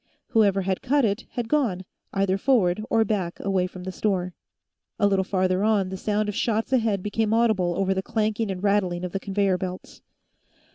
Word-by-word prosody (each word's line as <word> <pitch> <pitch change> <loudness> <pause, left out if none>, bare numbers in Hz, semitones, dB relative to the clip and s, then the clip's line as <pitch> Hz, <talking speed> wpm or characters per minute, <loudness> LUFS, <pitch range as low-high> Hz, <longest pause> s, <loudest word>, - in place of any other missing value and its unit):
Whoever 205 -5 +3
had 190 0 -1
cut 280 0 +2
it 205 +2 -2
had 240 -2 -3
gone, 225 -11 0 0.3
either 195 -1 0
forward 215 -6 +2
or 225 -1 +3
back 190 -5 -2
away 190 -2 0
from 180 0 -10
the 185 - -4
store. 185 -3 -1 0.6
A 205 - +2
little 195 -1 +3
farther 185 0 0
on, 210 -3 +2
the 190 - -5
sound 210 +2 -1
of 210 - -2
shots 225 +3 -1
ahead 220 -6 +1
became 215 +1 0
audible 205 -7 +2
over 195 0 +1
the 190 - -1
clanking 215 +1 -1
and 190 0 -4
rattling 190 -4 +1
of 180 - -5
the 195 - -2
conveyor 195 -2 0
belts. 185 0 -7
200 Hz, 190 wpm, -25 LUFS, 185-220 Hz, 0.6 s, Whoever